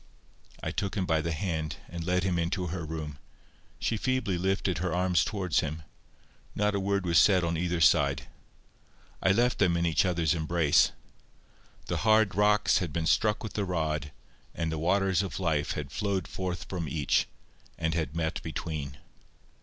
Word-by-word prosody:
I - - -2
took 100 -1 -3
him 95 -3 0
by 80 -3 +1
the 85 +2 -2
hand, 80 -2 -2
and 85 -1 -6
led 90 +1 +1
him 90 -2 0
into 90 +2 -1
her 90 -3 -4
room. 75 -2 -6 0.6
She 115 - -1
feebly 130 -5 0
lifted 95 -1 0
her 90 -2 -1
arms 90 -1 +2
towards 95 -7 0
him. 80 -1 -3 0.7
Not 105 0 +1
a 100 - 0
word 100 0 0
was 85 -1 +4
said 95 -3 +5
on 85 0 0
either 85 +1 -1
side. 80 - +4 1.0
I 95 - +4
left 120 +5 +2
them 90 -4 +3
in 85 - +1
each 80 +2 +3
other's 85 -5 +1
embrace. 80 -2 +3 0.9
The - - -2
hard 110 -2 +3
rocks 105 +2 +3
had 85 -4 -3
been 80 +2 -2
struck 105 +6 +2
with 110 - -6
the 105 - -1
rod, 80 -5 -2 0.4
and 80 -1 -2
the 80 - -3
waters 95 +3 +2
of 95 - -4
life 80 -5 0
had 70 -2 -5
flowed 100 0 -1
forth 95 -1 -4
from 85 -5 -4
each, 75 -1 +1 0.5
and 80 0 -1
had 80 -3 -2
met 80 0 -2
between. 75 -4 -5
85 Hz, 175 wpm, -29 LUFS, 80-95 Hz, 1.0 s, said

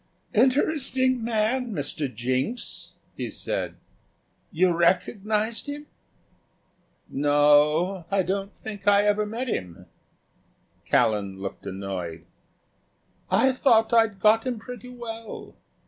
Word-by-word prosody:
"Interesting 260 0 +2
man, 230 +2 0
Mr. 145 -3 -2
Jinks?" 130 - -3 0.2
he - - -4
said; - - -4 0.8
"you 180 0 +2
recognised 210 - +1
him?" 290 +1 -6 1.2
"No," 150 +5 +3
I - - -11
said; 170 - -16
"I 195 -1 +2
don't 195 +2 -3
think 205 -2 -8
I 205 0 +6
ever 210 0 +2
met 235 +5 -4
him." 90 - -4 1.0
Callan 100 -3 +1
looked 95 0 -7
annoyed. 90 -4 -5 1.0
"I 265 - +4
thought 235 -4 +3
I'd 225 -4 +3
got 220 +4 +4
him 250 -2 -1
pretty 250 +2 -9
well. 230 -2 -8
205 Hz, 110 wpm, -25 LUFS, 145-235 Hz, 1.2 s, I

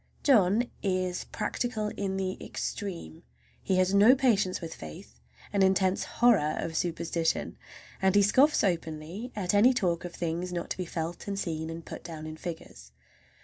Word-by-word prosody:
John 220 -4 +4 0.2
is 185 -2 -1
practical 215 0 -2
in 195 -2 -3
the 190 0 -3
extreme. 170 - -5 0.4
He 190 - 0
has 185 +1 +2
no 210 +6 +7
patience 210 -8 +2
with 165 -2 -6
faith, 75 -5 -11 0.3
an 200 - +2
intense 190 0 +3
horror 205 -11 +3
of 160 - -3
superstition, 170 -1 -1 0.5
and 190 0 +3
he 205 - +6
scoffs 270 +9 +4
openly 170 +5 -2
at 190 -3 -1
any 235 +6 +5
talk 175 -7 0
of 175 -1 -7
things 175 +1 -3
not 175 -1 -4
to - - -2
be 185 - -3
felt 165 +2 -5
and 200 -1 -2
seen 160 -4 -3
and 165 0 -7
put - - -8
down 160 -2 -7
in 155 0 -6
figures. 160 - -8
185 Hz, 165 wpm, -29 LUFS, 165-205 Hz, 0.5 s, no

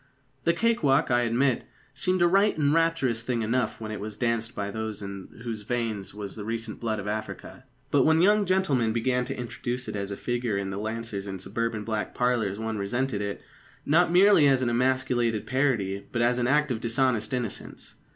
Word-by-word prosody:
The 170 - +4
cake 230 +6 +1
walk, 135 -3 +3
I 120 0 +4
admit, 120 +2 +1 0.3
seemed 185 +6 +1
a - - +6
right 195 +3 +3
and 145 -1 +2
rapturous 165 -8 +1
thing 115 -1 -1
enough 115 +1 0
when 110 -1 -5
it 110 - -4
was 105 0 -6
danced 115 -1 -1
by 100 0 -3
those 110 -1 -4
in 100 -1 -7 0.2
whose 115 -3 -4
veins 110 -3 -3
was 100 -1 -7
the 105 - -6
recent 115 0 -4
blood 110 -2 -1
of 100 0 -5
Africa. 110 +4 -5 0.3
But 145 - +4
when 160 +2 +4
young 205 0 +4
gentlemen 145 -12 +2
began 125 +2 +1
to 135 - -5
introduce 125 +1 -4
it - - -4
as 100 -1 -3
a 100 - -5
figure 120 -4 -1
in 100 -1 -3
the 95 - -4
lancers 110 -2 -4
in 95 -1 -4
suburban 115 +3 -3
back 110 -2 -3
parlours 120 -5 +1
one 110 -1 -3
resented 120 +2 -1
it, 100 0 -4 0.4
not 170 +3 +4
merely 180 -4 +6
as 135 -2 +3
an 120 - +1
emasculated 125 -3 +1
parody, 115 -8 0
but 120 -1 0
as 120 +1 +2
an 120 - +1
act 150 +1 +2
of 115 -2 -2
dishonest 120 -1 +1
innocence. 125 -5 -4
120 Hz, 200 wpm, -27 LUFS, 110-135 Hz, 0.4 s, a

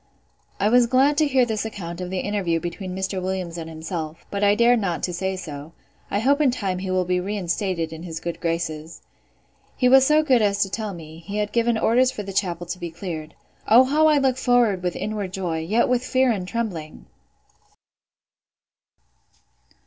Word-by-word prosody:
I 200 - +2
was 245 +1 +5
glad 265 +4 +3
to 310 - +4
hear 260 -3 +3
this 220 -3 -2
account 185 -5 -6
of 180 - -4
the 190 - -3
interview 190 -5 -1
between 180 +2 -5
Mr. 190 0 -2
Williams 185 -2 -3
and 165 0 -6
himself; 160 0 -6
but 200 0 -2
I 205 0 +5
dared 235 +2 +4
not 180 -5 -2
to 180 - -1
say 190 +2 -2
so. 155 -3 -8 0.4
I - - -1
hope 280 +7 +2
in 290 - +4
time 195 -7 -2
he 190 0 -4
will 185 0 +1
be 180 0 +1
reinstated 180 -3 -2
in 160 - -8
his 165 -2 -6
good 170 -1 -5
graces. 165 -1 -3 0.7
He 250 - +3
was 265 +1 +7
so 305 +3 +4
good 260 -6 +3
as 200 -1 +1
to 195 - -6
tell 215 -3 -3
me, 160 -1 -11
he 205 +1 -4
had 210 0 -1
given 235 0 +2
orders 250 +3 +3
for 255 -5 -5
the 195 0 -7
chapel 175 -3 -1
to 175 +1 -6
be 175 -1 -4
cleared. 165 -2 -7 0.3
O 235 +4 +7
how 300 +4 +3
I 305 -1 +4
look 265 -2 +2
forward 245 -7 +2
with 180 -1 -2
inward 205 -3 -4
joy, 175 -4 -2
yet 210 +9 +1
with 250 0 +1
fear 255 0 +2
and 190 -5 -3
trembling! 185 -9 -4
195 Hz, 195 wpm, -23 LUFS, 170-235 Hz, 0.7 s, was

